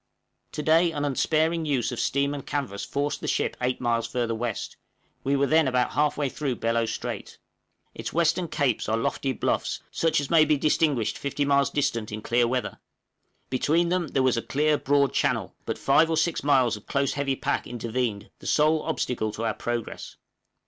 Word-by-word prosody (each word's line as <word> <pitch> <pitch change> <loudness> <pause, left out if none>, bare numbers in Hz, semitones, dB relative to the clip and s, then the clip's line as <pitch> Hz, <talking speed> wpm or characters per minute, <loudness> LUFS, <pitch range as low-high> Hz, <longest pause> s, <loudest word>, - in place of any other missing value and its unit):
To 150 - -3
day 165 +2 +4
an 145 -1 -2
unsparing 160 +4 +1
use 135 -5 0
of 125 - -5
steam 140 +1 +1
and 140 -2 -5
canvas 135 -9 -3
forced 145 0 -2
the - - -4
ship - - 0
eight 125 0 0
miles 115 -1 0
further 120 -1 -1
west; 115 -1 -4 0.5
we 140 +1 +1
were 140 0 +3
then 155 0 +3
about 125 -1 +1
half 150 0 +1
way 145 -1 0
through 135 -1 -2
Bellot 115 0 0
Strait! - - -5 0.6
Its - - -6
western 170 +2 +1
capes 140 -9 0
are 110 - +2
lofty 135 +4 -1
bluffs, 130 - -1
such 165 -3 +1
as 145 +1 -4
may 165 -2 +7
be 155 -1 +2
distinguished 145 -5 +1
fifty 140 +1 -1
miles 140 0 +3
distant 125 -7 -1
in 105 0 -6
clear 120 0 +2
weather; 125 +1 -2 0.7
between 160 +6 +2
them 180 -2 0
there 135 - 0
was 130 -2 +2
a - - 0
clear 150 +4 +1
broad 140 -1 +2
channel, - - 0
but - - -2
five 155 +4 +4
or 160 - +1
six 160 +1 0
miles 130 -5 +3
of 105 - -13
close 140 0 0
heavy 140 -1 -1
pack - - -2
intervened 115 -3 -3
the - - -9
sole 155 +1 +3
obstacle 110 -4 -2
to 115 - -4
our 110 - 0
progress. 120 0 -5
140 Hz, 190 wpm, -26 LUFS, 120-150 Hz, 0.7 s, may